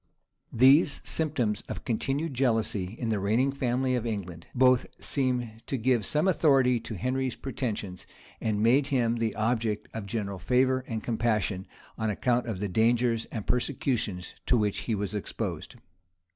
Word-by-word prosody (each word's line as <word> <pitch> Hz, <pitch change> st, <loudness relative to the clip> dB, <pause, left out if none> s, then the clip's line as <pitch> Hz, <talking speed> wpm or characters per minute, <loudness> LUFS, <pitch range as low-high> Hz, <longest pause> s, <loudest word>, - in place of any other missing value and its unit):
These 140 Hz, +5 st, +5 dB
symptoms 125 Hz, -10 st, 0 dB
of -, -, -6 dB
continued 135 Hz, +6 st, -1 dB
jealousy 110 Hz, -6 st, 0 dB
in 115 Hz, -, -2 dB
the 110 Hz, -2 st, +1 dB
reigning 115 Hz, +8 st, +2 dB
family 130 Hz, -1 st, 0 dB
of 125 Hz, -3 st, 0 dB
England, 95 Hz, -7 st, -5 dB
both 130 Hz, -1 st, +4 dB
seemed 125 Hz, -5 st, -1 dB
to 135 Hz, -, -1 dB
give 120 Hz, -3 st, +1 dB
some 150 Hz, +5 st, +1 dB
authority 135 Hz, -8 st, +4 dB
to 115 Hz, 0 st, -7 dB
Henry's 130 Hz, +3 st, -1 dB
pretensions, 105 Hz, -9 st, -4 dB, 0.3 s
and 105 Hz, -1 st, 0 dB
made 135 Hz, +5 st, +4 dB
him 120 Hz, -4 st, +1 dB
the 115 Hz, -1 st, -1 dB
object 110 Hz, -1 st, -1 dB
of 110 Hz, -3 st, -5 dB
general 100 Hz, -3 st, -3 dB
favor 130 Hz, +5 st, +2 dB
and 110 Hz, -2 st, -4 dB
compassion, 110 Hz, -5 st, 0 dB, 0.3 s
on 110 Hz, -1 st, 0 dB
account 120 Hz, +4 st, 0 dB
of 110 Hz, -5 st, -3 dB
the 105 Hz, -, -1 dB
dangers 115 Hz, +3 st, +2 dB
and 110 Hz, -4 st, -6 dB
persecutions 120 Hz, -7 st, -1 dB
to 125 Hz, -, +4 dB
which 105 Hz, -2 st, 0 dB
he 110 Hz, -, +2 dB
was 100 Hz, -1 st, -3 dB
exposed. 105 Hz, -, -4 dB
115 Hz, 155 wpm, -28 LUFS, 105-130 Hz, 0.3 s, These